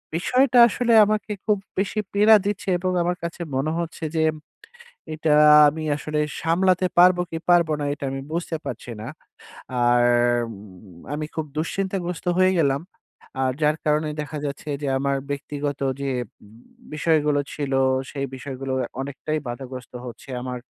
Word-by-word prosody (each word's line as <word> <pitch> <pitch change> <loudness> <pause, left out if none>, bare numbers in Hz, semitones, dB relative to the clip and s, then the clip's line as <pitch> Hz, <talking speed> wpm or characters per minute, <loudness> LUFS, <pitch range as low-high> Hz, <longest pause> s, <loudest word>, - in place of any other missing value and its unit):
বিষয়টা 250 +8 +2
আসলে 235 +1 0
আমাকে 215 0 -1
খুব 210 -2 +2 0.2
বেশি 205 +2 -1
পীড়া 210 +2 +6
দিচ্ছে 205 -1 -2
এবং 185 0 -1
আমার 175 +1 -1
কাছে 170 +1 -5
মনে 145 +4 0
হচ্ছে 170 -1 -5
যে, 160 - +3 0.9
এটা 155 -1 +1 0.3
আমি 155 +2 -3
আসলে 150 0 -3 0.2
সামলাতে 185 +2 +2
পারবো 180 0 +6
কি 165 - -3
পারব 175 -2 +5
না; - - -1
এটা 140 - -8
আমি 135 - -4
বুঝতে 165 -1 -2
পারছি 120 - -6
না। 110 - -7 0.8
আর 120 0 +4 1.1
আমি 155 +1 -3
খুব 160 -1 -2
দুশ্চিন্তাগ্রস্ত 180 +1 -3
হয়ে 185 0 +4
গেলাম। 140 -1 +2 0.6
আর 130 - +1
যার 150 +1 +2
কারণে 150 0 +1
দেখা 150 +1 -6
যাচ্ছে 140 +1 -5
যে, - - -1
আমার 140 0 0
ব্যক্তিগত 145 0 -4 0.2
যে 135 -1 -1 0.8
বিষয়গুলো 150 -2 +2
ছিল, 145 -2 -4 0.4
সেই 140 -1 -3
বিষয়গুলো 135 0 -5 0.3
অনেকটাই 140 +3 -3
বাধাগ্রস্ত 125 +1 -7
হচ্ছে। 120 - -11
আমার 125 -1 -4
155 Hz, 140 wpm, -23 LUFS, 140-180 Hz, 1.1 s, পীড়া